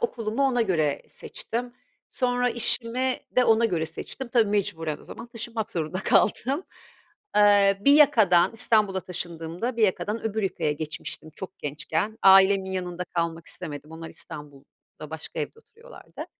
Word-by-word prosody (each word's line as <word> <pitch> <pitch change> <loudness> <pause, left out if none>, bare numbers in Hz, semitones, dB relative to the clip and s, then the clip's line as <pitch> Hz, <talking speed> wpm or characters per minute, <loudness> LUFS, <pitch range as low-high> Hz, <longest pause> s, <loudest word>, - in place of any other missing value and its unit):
okulumu 240 - -2
ona 250 -3 +2
göre 155 -8 0
seçtim, 240 +1 -5 0.4
sonra 245 -1 0
işimi 240 +2 0 0.2
de 250 - +5
ona 225 0 +4
göre 170 -7 0
seçtim. 260 +9 -7
Tabii 230 -4 +2
mecburen 185 -7 -1
o - - -17
zaman 230 - -10
taşınmak 230 -2 -5
zorunda 165 +2 -3
kaldım. 270 - +2 0.7
Eee, 205 -1 +5
bir 280 - +7
yakadan 225 - +5
İstanbul'a 215 -4 +4
taşındığımda 175 +6 -5
bir 225 - 0
yakadan 210 +2 0
öbür 220 -1 -2
yakaya 180 -5 -1
geçmiştim 155 +1 -5
çok 190 +4 -9
gençken. 160 +8 -3
Ailemin 190 0 +6
yanında 180 -1 -4
kalmak 165 -1 -3
istemedim. 150 +1 -7
Onlar 165 0 -8
İstanbul'da 145 +1 -12
başka 160 0 -7
evde 450 - -5
oturuyorlardı. 465 +2 -12
200 Hz, 140 wpm, -25 LUFS, 165-235 Hz, 0.7 s, bir